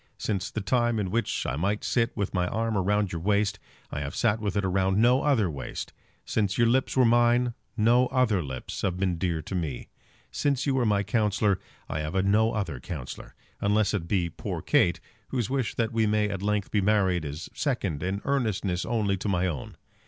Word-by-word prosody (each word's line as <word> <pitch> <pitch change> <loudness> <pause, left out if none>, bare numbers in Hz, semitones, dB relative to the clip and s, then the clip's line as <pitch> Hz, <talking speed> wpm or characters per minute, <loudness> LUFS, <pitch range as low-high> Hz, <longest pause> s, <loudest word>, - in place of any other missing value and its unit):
Since 100 -2 -2
the 110 - -4
time 120 +3 +1
in 95 -4 -1
which 115 0 -1
I 65 - -1
might 100 +7 -1
sit 115 -1 0
with 100 -2 -2
my 90 -2 +1
arm 115 +2 -1
round 100 0 +1
your 85 - -4
waist, 105 +2 +1 0.3
I - - -3
have 70 0 -4
sat 110 -2 +2
with 105 -2 -2
it 100 - +1
round 95 +1 +1
no 125 +4 +4
other 130 -9 +3
waist. 70 -5 -6 0.3
Since 105 -2 0
your 120 - +4
lips 130 +3 +1
were 130 - +6
mine, 120 +1 +4 0.2
no 120 +3 +4
other 125 -7 +2
lips 65 -5 -6
have 90 -3 -1
been 95 -3 0
dear 85 -4 -1
to 95 - -7
me. 80 -9 -3 0.4
Since 140 -2 0
you 140 - +1
were 125 -3 +2
my 100 -1 +2
counsellor, 105 -2 +1 0.3
I 80 - -3
have 75 +3 -4
had 95 0 +2
no 110 +3 +3
other 85 - -3
counsellor, 70 -2 -7 0.2
unless 105 0 +2
it 90 -5 -2
be 90 -2 +1
poor 80 - -5
Kate, 85 - +3 0.3
whose 125 -3 -2
wish 135 -4 -1
that 115 0 -1
we 110 -1 +2
may 105 0 +2
at 100 -2 -4
length 105 -1 -1
be 105 - +2
married 95 -4 +2
is 75 +3 -6
second 100 - -1
in 95 +2 -2
earnestness 105 -9 0
only 105 -4 +1
to 100 - -3
my 90 -1 +1
own. 75 -9 -4
105 Hz, 205 wpm, -27 LUFS, 90-115 Hz, 0.4 s, were